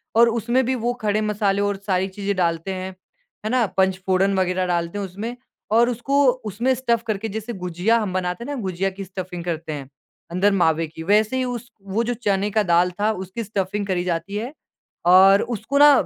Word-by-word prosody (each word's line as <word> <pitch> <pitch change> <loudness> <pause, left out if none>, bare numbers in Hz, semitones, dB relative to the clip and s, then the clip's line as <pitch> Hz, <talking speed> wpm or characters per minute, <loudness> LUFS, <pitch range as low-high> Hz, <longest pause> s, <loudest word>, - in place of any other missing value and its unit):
और 235 +1 +6
उसमें 235 +3 +1
भी 260 +2 0
वो 240 0 -1
खड़े 215 0 +1
मसाले 205 -2 +1
और 205 -1 0
सारी 190 -1 +1
चीज़ें 200 +1 -3
डालते 170 +1 0
हैं, 185 0 -5 0.5
है - - 0
ना। 250 -2 +3
पंचफोड़न 190 +1 +2
वगैरह 185 0 +1
डालते 170 +1 -1
हैं 200 - -2
उसमें 205 +6 -6 0.4
और 235 +2 +5
उसको 275 +4 +1 0.2
उसमें 230 +6 0
स्टफ़ 235 -2 0
करके 215 0 -1
जैसे 220 +3 -5
गुझिया 180 +4 0
हम 205 -4 -3
बनाते 180 +2 -2
हैं 285 +4 -4
ना, 255 - -4
गुझिया 190 0 -1
की 195 +1 -8
स्टफ़िंग 185 -2 -6
करते 160 -2 -3
हैं 140 -3 -7 0.4
अंदर 190 +4 +3
मावे 165 -3 +2
की, 160 +1 -9
वैसे 215 +7 +2
ही 260 - +1
उस 245 -1 -4
वो 200 +4 -1
जो 240 +1 -1
चने 205 -3 0
का 215 +1 +2
दाल 175 0 +3
था 210 +1 +2
उसकी 190 +3 -5
स्टफ़िंग 200 -1 -2
करी 180 -2 0
जाती 180 +3 -3
है। 240 +6 -4 0.5
और 190 +3 +7
उसको 235 +3 -2
ना 290 +1 +9
200 Hz, 200 wpm, -22 LUFS, 185-230 Hz, 0.5 s, ना